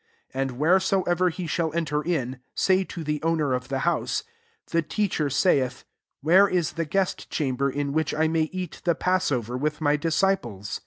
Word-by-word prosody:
14 135 - -2
And 125 - -9
wheresoever 185 +2 +3
he 175 +1 -5
shall 165 0 -1
enter 150 -3 0
in, 135 -7 -2 0.2
say 190 0 +3
to 175 -2 -7
the 150 -1 -2
owner 155 -4 +1
of 125 0 -2
the 135 - -2
hous^ 170 - 0 0.2
,* 455 -1 -40
The 165 - +3
Teacher 165 -1 -1
saithy 135 -3 +1 0.4
Where 180 +7 +6
is 180 -4 0
the 165 0 -3
guest 190 +4 -1
chamber,, 140 -2 0
in 140 +1 -2
which^ 160 -1 0
I 160 0 +3
,may 160 -1 +1
eat 185 -1 -6
the 170 -2 +2
passover 135 - 0
with 150 +3 -1
my 150 -1 +2
'disciples 150 - 0
160 Hz, 180 wpm, -25 LUFS, 140-180 Hz, 0.4 s, Where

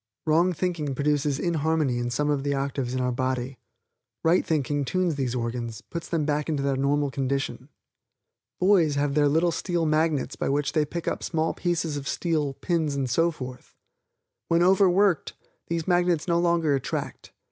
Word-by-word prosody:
Wrong 165 +4 +3
thinking 165 -4 -2
brings 145 +1 +1
inharmony 155 -5 0
in 120 0 -2
some 150 +4 0
of 145 -2 0
the 140 0 0
octaves 135 -2 -2
of 130 - 0
our 125 0 0
body. 130 0 -2 0.6
Right 165 +3 +4
thinking 145 -2 0
tunes 185 +3 0
these 130 -4 -2
organs, 115 -2 -3
puts 170 +6 -7
them 160 -3 0
back 150 +1 -1
into 145 -3 -1
their 140 -1 +1
normal 140 +1 +1
condition. 135 -1 -2 0.9
Boys 180 -6 +4
have 140 0 0
their 145 0 +3
little 165 +4 +2
steel 175 -1 -1
magnets 155 -2 +1
by - - -2
which 145 +1 0
they 155 -2 +2
pick 170 +3 -6
up - - -1
small 160 -1 -1
pieces 170 -4 -1
of 140 -1 -6
steel, 150 -5 -1
pins 160 -3 -1
and 135 -2 -1
so 165 +6 +3
forth. 130 -5 -9 0.7
When 170 +1 +3
overworked, 190 0 +3 0.3
these 165 -1 -2
magnets 175 -2 +2
no 170 -1 +2
longer 170 -3 +2
attract. 135 - -4
150 Hz, 170 wpm, -26 LUFS, 135-170 Hz, 0.9 s, Right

